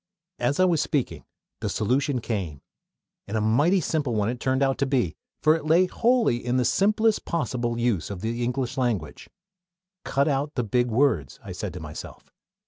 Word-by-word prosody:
As 125 +6 0
I 185 - +6
was 170 -4 +2
speaking 145 -5 -2 0.3
the - - -2
solution 130 +4 0
came 95 - -4 0.6
and 105 +2 -2
a - - +2
mighty 145 - +3
simple 150 -7 -1
one 105 0 +1
it 120 0 -4
turned 130 +2 +1
out 135 -1 +1
to 140 - +1
be; 125 - 0 0.3
for 155 +1 +5
it 160 - -4
lay 170 +4 +5
wholly 230 - +2
in 125 +1 0
the 125 - +2
simplest 215 - +2
possible 120 -8 -2
use 115 -8 0
of 100 -3 -6
the 115 +2 -2
English 125 +1 -2
language. 110 - -2 0.7
"Cut 140 +2 +1
out 145 +1 -1
the 125 - 0
big 120 +3 +1
words," 115 - +1
I - - -8
said - - -4
to - - -7
myself. - - -9
125 Hz, 185 wpm, -25 LUFS, 115-150 Hz, 0.7 s, I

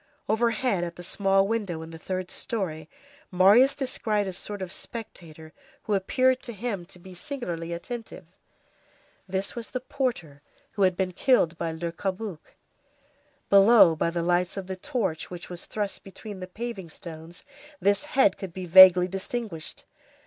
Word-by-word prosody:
Overhead, 220 -2 +1
at 170 -1 -5
the 175 - -9
small 195 +1 +2
window 200 -7 -2
in 160 - -10
the 165 - -10
third 185 +2 -4
story 160 -8 -4 0.4
Marius 205 +10 +5
descried 240 -7 -1
a 190 - -4
sort 205 +3 -6
of 180 - -6
spectator 165 -10 -8 0.3
who 215 - -2
appeared 255 +6 +2
to 235 - -7
him 200 -5 -4
to 185 - -12
be 185 +1 -13
singularly 175 - -5
attentive. 220 +2 -7 1.0
This 190 +1 -2
was 235 -1 -6
the 255 - -3
porter 245 - -3 0.3
who 205 - -5
had 185 -2 +3
been 185 -1 0
killed 180 -4 +2
by 165 - -2
Le 165 +1 -4
Cabuc. 190 0 -5 1.0
Below, 200 -3 +7
by 165 - 0
the 170 0 -2
lights 175 +2 +1
of 195 - -4
the 190 0 -5
torch, 190 - -3
which 175 0 -8
was 175 - -7
thrust 205 -2 -4
between 200 +1 -9
the 185 - -6
paving 210 -2 -6
stones, 165 +1 -10 0.4
this 200 0 +2
head 255 -8 +3
could 190 -4 -7
be 185 0 -5
vaguely 180 0 +9
distinguished. 190 -2 -5
190 Hz, 160 wpm, -26 LUFS, 175-220 Hz, 1.0 s, vaguely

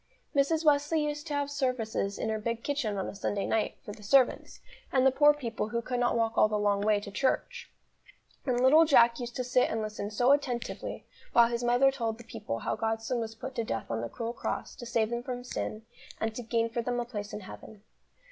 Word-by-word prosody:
Mrs. 310 +4 +2
Wesley 300 +1 +3
used 295 +1 -4
to 295 - -2
have 285 0 -1
services 245 -8 -1
in - - -2
her 220 0 -1
big 230 +1 -3
kitchen 255 -8 -1
on 190 - -2
a - - -6
Sunday 200 0 -2
night, 220 -1 0
for - - -6
the 210 - -11
servants, 255 +5 +2 0.3
and 260 -1 +3
the 265 - +6
poor 295 +3 +6
people 235 -7 -3
who 235 - -1
could 245 +1 -3
not 240 -1 +2
walk 225 -1 0
all - - +6
the 215 0 -1
long 205 -1 +1
way 210 0 +3
to 205 0 -9
church; 475 - -1 0.7
and 250 -3 0
little 275 +6 +7
Jack 235 -6 +5
used 240 -1 -6
to 255 - -1
sit 250 0 +2
and 225 - -1
listen 210 -1 -4
so 245 +5 +3
attentively, 255 -5 -1 0.3
while 235 -1 +6
his 235 0 -2
mother 245 +3 +4
told 230 -4 -3
the 235 - -12
people 115 - -5
how - - -2
God's 225 0 -2
Son 245 0 -1
was 225 -1 -4
put 260 +4 -7
to 235 -3 -1
death 115 - -4
on 115 0 -1
the 115 - -4
cruel 230 - -4
cross, - - -4
to 240 - -8
save 230 -1 0
them 235 0 -2
from 245 0 -5
sin, 225 -3 -4 0.4
and 220 0 -1
to 245 - -5
gain 230 0 0
for 230 +1 -2
them 245 +1 -2
a 240 - -2
place 210 -4 -6
in 210 - -6
heaven. 205 +2 -11
235 Hz, 235 wpm, -29 LUFS, 220-260 Hz, 0.7 s, little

